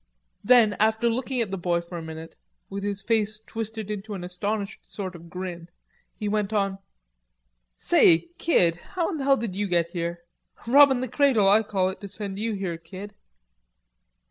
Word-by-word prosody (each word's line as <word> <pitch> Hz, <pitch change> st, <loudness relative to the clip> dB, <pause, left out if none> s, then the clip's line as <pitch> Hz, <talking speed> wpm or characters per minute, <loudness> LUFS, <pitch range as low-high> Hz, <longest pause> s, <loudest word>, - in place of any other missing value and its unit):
Then, 230 Hz, -2 st, +6 dB
after 220 Hz, +2 st, +2 dB
looking 255 Hz, +1 st, -1 dB
at 215 Hz, -4 st, -2 dB
the 195 Hz, -, -3 dB
boy 175 Hz, -1 st, +1 dB
for 170 Hz, +1 st, -9 dB
a 170 Hz, -, -4 dB
minute, 160 Hz, 0 st, -9 dB, 0.4 s
with 200 Hz, 0 st, -4 dB
his 200 Hz, -1 st, -3 dB
face 215 Hz, -1 st, 0 dB
twisted 220 Hz, -1 st, -5 dB
into 210 Hz, 0 st, -5 dB
an 180 Hz, -, -6 dB
astonished 200 Hz, +3 st, -3 dB
sort 190 Hz, -3 st, -5 dB
of 170 Hz, 0 st, -12 dB
grin, 175 Hz, -1 st, -6 dB, 0.5 s
he 210 Hz, -, -4 dB
went 210 Hz, 0 st, 0 dB
on: 195 Hz, -2 st, 0 dB, 1.0 s
"Say, 165 Hz, -, +5 dB
kid, 175 Hz, -, +3 dB
how 345 Hz, -, -3 dB
in 320 Hz, -, -4 dB
hell 275 Hz, 0 st, +3 dB
did 220 Hz, -6 st, -4 dB
you 205 Hz, +1 st, -1 dB
git 170 Hz, -2 st, +1 dB
here? 170 Hz, 0 st, -4 dB, 0.4 s
Robbin' 265 Hz, +1 st, +6 dB
the 255 Hz, -, -2 dB
cradle, 250 Hz, -6 st, +3 dB
Oi 205 Hz, +3 st, +6 dB
call 195 Hz, -4 st, 0 dB
it, 190 Hz, -, -8 dB
to 200 Hz, -, -6 dB
send 200 Hz, -1 st, -5 dB
you 225 Hz, +1 st, -1 dB
here, 185 Hz, -5 st, -4 dB
kid." 185 Hz, +5 st, -10 dB
200 Hz, 175 wpm, -25 LUFS, 180-220 Hz, 1.0 s, Then